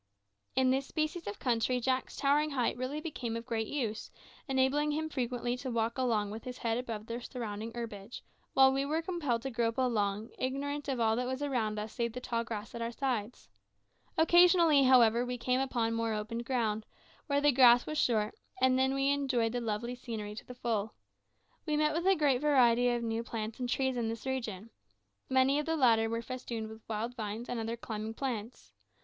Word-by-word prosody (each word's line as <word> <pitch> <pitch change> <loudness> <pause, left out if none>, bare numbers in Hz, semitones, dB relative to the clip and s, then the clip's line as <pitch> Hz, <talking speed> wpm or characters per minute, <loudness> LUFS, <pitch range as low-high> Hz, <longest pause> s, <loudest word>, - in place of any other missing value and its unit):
In 260 -1 +4
this 270 +1 0
species 310 +2 -2
of 205 - -4
country 245 0 +1
Jack's 260 +1 -1
towering 290 +2 +2
height 255 -5 0
really 255 +4 -3
became 250 -8 -4
of 230 - -7
great 225 -3 -2
use, 225 -7 -3 0.4
enabling 270 +2 +2
him 315 +1 -1
frequently 245 -3 -2
to 260 +1 -5
walk 230 -1 0
along 220 -5 +1
with 220 +1 -7
his 250 -1 -6
head 230 0 -1
above 225 -4 -5
the 235 +1 -5
surrounding 225 -3 -5
herbage, 220 -2 -7 0.3
while 265 0 +6
we 270 +1 +1
were 310 +4 -1
compelled 300 -10 -1
to 270 - -3
grope 230 0 0
along, 215 -4 0
ignorant 285 +3 -2
of 265 -3 -1
all 220 -1 +3
that 250 0 -1
was 260 +2 -3
around 230 -7 -1
us 210 +1 -5
save 235 -1 -2
the 250 - -4
tall 235 -2 -2
grass 225 -2 -6
at 235 - -5
our 230 0 -2
sides. 245 -3 -3 0.7
Occasionally, 340 -2 +6
however, 240 -2 +6
we 250 0 -3
came 250 +2 +1
upon 240 -4 0
more 230 -1 0
open 220 +2 -4
ground, 225 -3 -1 0.4
where 285 -1 +2
the 290 0 +4
grass 245 -2 +7
was 305 0 -2
short, 215 -6 +1 0.3
and 260 0 +4
then 265 +1 +2
we 275 0 +2
enjoyed 260 -5 +1
the 245 +1 -2
lovely 230 +2 -2
scenery 225 -4 -6
to 215 - -9
the 250 - -9
full. 225 -3 -2 0.7
We 300 -1 +1
met 305 0 +2
with 340 +3 -1
a 385 - +6
great 280 -5 +2
variety 245 -5 +4
of 240 -1 0
new 225 0 -1
plants 225 -1 -5
and 250 -1 -2
trees 265 0 0
in 235 -2 -1
this 230 +2 -6
region. 230 -5 -4 0.6
Many 265 +2 +3
of 300 - -3
the 325 0 +1
latter 225 -5 +4
were 230 +1 -2
festooned 235 -3 -5
with 220 0 -11
wild 225 +2 -2
vines 220 +1 -5
and 245 - -3
other 225 +1 -3
climbing 220 -1 -5
plants. 235 -4 -5
245 Hz, 200 wpm, -32 LUFS, 225-270 Hz, 0.7 s, grass